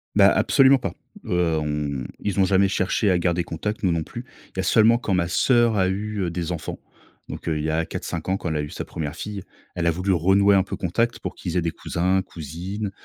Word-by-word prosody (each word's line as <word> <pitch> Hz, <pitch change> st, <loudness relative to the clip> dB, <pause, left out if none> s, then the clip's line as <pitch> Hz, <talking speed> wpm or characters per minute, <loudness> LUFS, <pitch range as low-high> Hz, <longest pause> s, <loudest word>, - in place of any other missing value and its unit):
Bah -, -, +7 dB
absolument 135 Hz, 0 st, +5 dB
pas, -, -, -4 dB, 0.3 s
heu, 90 Hz, -3 st, +1 dB
on 75 Hz, -3 st, -2 dB, 0.2 s
ils 100 Hz, -1 st, -2 dB
ont 95 Hz, -, +5 dB
jamais 95 Hz, +1 st, +3 dB
cherché 95 Hz, +2 st, +1 dB
à 90 Hz, -, +2 dB
garder 85 Hz, 0 st, +1 dB
contact, 105 Hz, +8 st, -4 dB
nous 95 Hz, -, +3 dB
non 85 Hz, -1 st, 0 dB
plus. -, -, -8 dB, 0.3 s
Il -, -, -15 dB
y -, -, -1 dB
a -, -, +1 dB
seulement 115 Hz, +1 st, +5 dB
quand 115 Hz, -5 st, -2 dB
ma 90 Hz, -2 st, +1 dB
sœur 120 Hz, +4 st, +3 dB
a 95 Hz, -1 st, +3 dB
eu, 105 Hz, +2 st, -2 dB
heu, 85 Hz, -2 st, -1 dB
des 85 Hz, 0 st, -3 dB
enfants. 80 Hz, -4 st, -5 dB, 0.5 s
Donc, -, -, -7 dB
heu, 80 Hz, -2 st, 0 dB
il -, -, -3 dB
y 80 Hz, -, -1 dB
a 80 Hz, +1 st, 0 dB
4-5 80 Hz, 0 st, -5 dB
ans, 95 Hz, +1 st, +1 dB
quand 85 Hz, -, -4 dB
elle 80 Hz, -, -2 dB
a -, -, 0 dB
eu 75 Hz, -, -7 dB
sa -, -, -5 dB
première 75 Hz, -3 st, -5 dB
fille, 100 Hz, -3 st, -6 dB, 0.3 s
elle 85 Hz, -, -1 dB
a 85 Hz, -, +4 dB
voulu 90 Hz, +4 st, -1 dB
renouer 95 Hz, +4 st, +4 dB
un 95 Hz, -, +4 dB
peu 100 Hz, -, -5 dB
contact 115 Hz, +7 st, -1 dB
pour -, -, -5 dB
qu'ils 90 Hz, -1 st, -4 dB
aient -, -, +2 dB
des 85 Hz, -, 0 dB
cousins, 95 Hz, +3 st, 0 dB
cousines 90 Hz, +7 st, -6 dB
90 Hz, 250 wpm, -23 LUFS, 85-100 Hz, 0.5 s, Bah